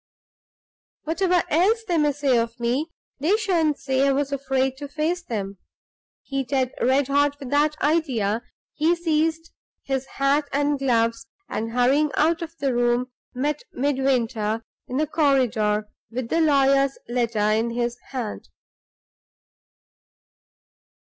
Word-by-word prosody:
"Whatever 355 +2 +1
else 410 +9 +3
they 345 -3 +1
may 295 -1 +3
say 280 -2 +1
of 230 +1 -3
me, 245 +6 0 0.3
they 340 +10 +2
shan't 335 -9 +1
say 265 0 +1
I - - +4
was 280 +1 0
afraid 265 -1 0
to 285 +1 -6
face 315 +5 -1
them." 200 - -5 0.6
Heated 270 -1 -1
red 265 +2 +3
hot 285 +1 +2
with 265 -3 -8
that 300 +1 +2
idea, 255 -9 +1 0.3
he 320 +3 +2
seized 325 -1 0 0.3
his 270 -1 -2
hat 280 +1 +1
and 290 0 +1
gloves, 230 -4 +1 0.2
and 225 +1 -4
hurrying 265 +5 +3
out 330 +2 +2
of 330 0 -7
the 275 -4 0
room, 240 +1 +1 0.2
met 290 +3 -1
Midwinter 245 -5 0 0.2
in 255 - -3
the 305 - +2
corridor 245 -9 +1 0.2
with 240 0 -4
the 330 - +2
lawyer's 275 -2 +3
letter 230 -3 0
in 225 +2 +1
his 240 +1 -2
hand. 245 -6 -5
275 Hz, 130 wpm, -24 LUFS, 240-300 Hz, 0.6 s, I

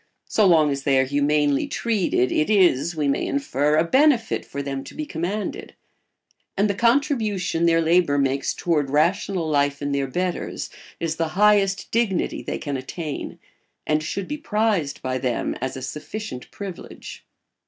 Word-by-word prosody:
So 210 -2 +3
long 155 -4 +5
as 140 0 -2
they 135 0 +2
are 130 - +4
humanely 145 +1 +1
treated, 200 - 0
it 155 - +1
is, 175 -6 +3
we 150 -2 0
may 140 - +1
infer, 150 - 0
a 160 - +4
benefit 255 - +3
for 140 0 -6
them 135 -1 -4
to - - -11
be 305 - -4
commanded; 190 - -4 0.8
and 200 +2 +3
the 200 - 0
contribution 220 - +1
their 165 0 +4
labour 165 -3 +3
makes 135 0 0
toward 150 -5 0
rational 170 +4 +1
life 145 -2 +1
in 145 0 -3
their 140 -1 0
betters 180 +6 -3 0.3
is 160 -1 -2
the 165 - 0
highest 200 -2 +3
dignity 220 -6 0
they - - -4
can 145 -3 -3
attain, 145 +3 -6 0.5
and 155 0 +1
should 185 +4 -4
be 295 - -3
prized 210 - 0
by 130 0 -1
them 125 -2 -1
as 130 0 -3
a 130 - -7
sufficient 150 - -6
privilege. 195 -4 -9
165 Hz, 165 wpm, -23 LUFS, 140-200 Hz, 0.8 s, long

